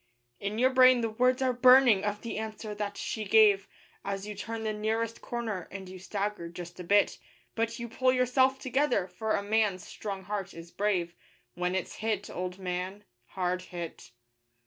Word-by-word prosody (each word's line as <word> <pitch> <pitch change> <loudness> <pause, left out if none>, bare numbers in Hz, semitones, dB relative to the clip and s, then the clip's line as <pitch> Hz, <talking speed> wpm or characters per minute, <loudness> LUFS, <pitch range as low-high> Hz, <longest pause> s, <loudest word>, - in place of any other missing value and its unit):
In 200 +2 -3
your 255 +3 +4
brain 255 -1 +6
the 225 -1 -1
words 250 +3 +2
are 255 -1 +2
burning 250 -4 +6
of 205 0 -2
the 230 -2 -4
answer 215 0 -5
that 205 -1 -4
she 220 - -3
gave, 205 -1 +5 0.4
As 195 0 -3
you 210 - -5
turn 225 +2 -5
the 215 -1 -1
nearest 220 +2 -2
corner 225 -7 -4
and 190 -1 -8
you 185 0 -9
stagger 200 -2 -3
just 175 +1 -9
a - - -5
bit; 200 +3 +3 0.3
But 230 0 -1
you 235 - -5
pull 255 +3 +2
yourself 260 +1 +3
together, 260 -5 +1
for 190 +4 -2
a 200 - -1
man's 205 -3 +1
strong 195 -2 -6
heart 195 -1 -4
is 165 0 -10
brave 185 -4 0 0.4
When 180 +1 -1
it's 190 - -3
hit, 215 -2 -2
old 180 0 -4
man 185 +2 -4 0.3
hard 180 -1 0
hit. 175 -2 -8
210 Hz, 180 wpm, -29 LUFS, 185-230 Hz, 0.4 s, brain